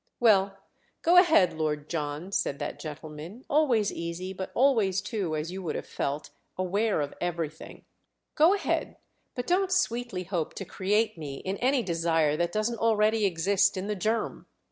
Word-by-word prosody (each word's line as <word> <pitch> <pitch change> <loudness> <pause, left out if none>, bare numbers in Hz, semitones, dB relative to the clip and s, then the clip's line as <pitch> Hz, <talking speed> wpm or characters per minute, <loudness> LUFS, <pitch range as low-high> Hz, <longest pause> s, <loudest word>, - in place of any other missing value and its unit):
"Well, 195 -4 +4 0.5
go 350 +2 +5
ahead, 325 - +6
Lord 155 -2 -2
John," 150 +3 -4
said 140 -7 0
that 145 0 -5
gentleman, 155 - -8
always 260 -9 +2
easy, 170 +3 -5
but 190 0 -5
always 225 -8 +3
too, 195 -6 -2
as 155 +3 -3
you 190 +1 -5
would 165 -4 -3
have - - -4
felt, 145 +2 -3 0.3
aware 195 0 +1
of 145 - -3
everything—"go 175 - -2
ahead, 400 - -2 0.4
but 245 - -3
don't 375 +2 +1
sweetly 240 - 0
hope 175 -4 -3
to 195 - -5
create 205 +1 0
me 145 -3 -5
in 190 +7 -4
any 260 0 +2
desire 165 -4 +1
that 170 +2 0
doesn't 215 +3 -1
already 220 -1 +3
exist 195 +3 +2
in 185 - -3
the 210 0 -2
germ. 220 +4 -2
190 Hz, 160 wpm, -28 LUFS, 165-225 Hz, 0.5 s, ahead